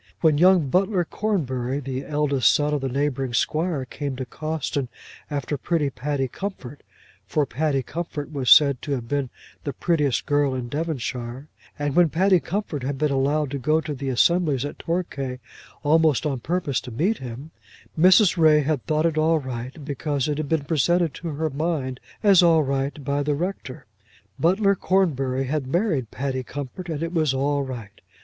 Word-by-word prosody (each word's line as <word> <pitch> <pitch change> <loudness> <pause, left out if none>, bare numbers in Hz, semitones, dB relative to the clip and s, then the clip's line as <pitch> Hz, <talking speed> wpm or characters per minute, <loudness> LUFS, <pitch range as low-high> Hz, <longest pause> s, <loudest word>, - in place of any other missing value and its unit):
When 155 -3 +4
young 180 -3 +5
Butler 185 +3 +1
Cornbury, 135 - -2
the 135 -1 -4
eldest 145 -5 +2
son 150 0 +1
of 145 - 0
the 135 - -2
neighbouring 135 -2 -1
squire, 155 +2 0
came 140 +1 -5
to 130 0 -4
Cawston 155 0 -3 0.4
after 145 -1 -3
pretty 150 -2 0
Patty 140 0 -2
Comfort, 145 -4 -7 0.5
for 150 - +1
Patty 140 +1 -1
Comfort 155 -1 -5
was 135 -3 -1
said 140 -4 +7
to 145 - -3
have 120 -4 -4
been 140 -1 -1 0.3
the 140 - -3
prettiest 150 -7 0
girl 145 -2 +1
in 125 -2 -4
Devonshire; 135 -3 -4 0.3
and 145 -1 -2
when 175 -2 +5
Patty 185 +3 +3
Comfort 175 -5 -3
had 135 +2 -3
been 150 +1 +1
allowed 140 +1 +1
to 140 - -3
go 155 +5 +2
to 155 -1 -4
the 135 0 -4
assemblies 145 +1 +2
at 145 - -7
Torquay 145 -7 -3 0.5
almost 155 -1 +3
on 140 -4 -1
purpose 150 -1 -1
to 125 - -9
meet 175 - 0
him, 130 +5 -8 0.4
Mrs. 185 +2 +5
Ray 155 -2 +5
had 145 -3 -1
thought 155 0 +1
it 160 -2 +1
all 160 +1 +3
right, 130 +1 -6
because 145 -1 -2
it 150 0 -1
had 150 -2 -3
been 160 -3 0
presented 165 +2 +2
to 170 - -7
her 155 0 -2
mind 140 -4 -2 0.2
as 200 -4 +7
all 165 -3 +5
right 140 +1 -2
by 140 +1 0
the 145 0 0
Rector. 170 -5 -5 0.5
Butler 195 +4 +3
Cornbury 135 -10 +1
had 135 0 -2
married 160 - 0
Patty 130 -1 -3
Comfort 145 +7 -7
and 160 -1 -3
it 165 +1 -4
was 155 -5 +1
all 140 +2 +1
right. 120 -7 -7
145 Hz, 175 wpm, -24 LUFS, 135-160 Hz, 0.5 s, said